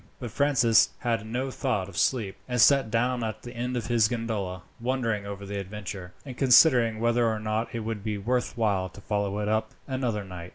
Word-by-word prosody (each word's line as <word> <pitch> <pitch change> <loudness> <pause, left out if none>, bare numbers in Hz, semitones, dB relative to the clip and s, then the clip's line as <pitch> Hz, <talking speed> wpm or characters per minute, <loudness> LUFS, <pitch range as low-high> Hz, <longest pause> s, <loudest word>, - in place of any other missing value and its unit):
But 120 -3 -6
Francis 125 -6 +4
had 115 -2 -1
no 130 +4 -2
thought 120 -9 -1
of 100 - -12
sleep, 105 +1 0
and 125 0 -1
sat 135 -1 +5
down 120 +2 0
at 110 -1 -4
his 120 - -8
end 125 +1 -3
of 115 - -3
the 115 -3 +3
gondola, 105 -7 -3 0.2
wondering 115 -4 -1
over 100 0 -6
the 100 0 -4
adventure, 100 -2 -7
and 130 -3 -7
considering 125 -4 +5
whether 120 +1 +2
or 110 -1 0
not 110 +2 -2
it 115 - -2
would 110 -2 -4
be 105 -1 -2
worth 120 +5 -1
while 100 -5 +1
to 95 - -14
follow 100 -1 -1
it 105 0 -2
up 110 +1 -1
another 125 -6 -2
night. 90 -2 -9
115 Hz, 205 wpm, -27 LUFS, 100-125 Hz, 0.2 s, sat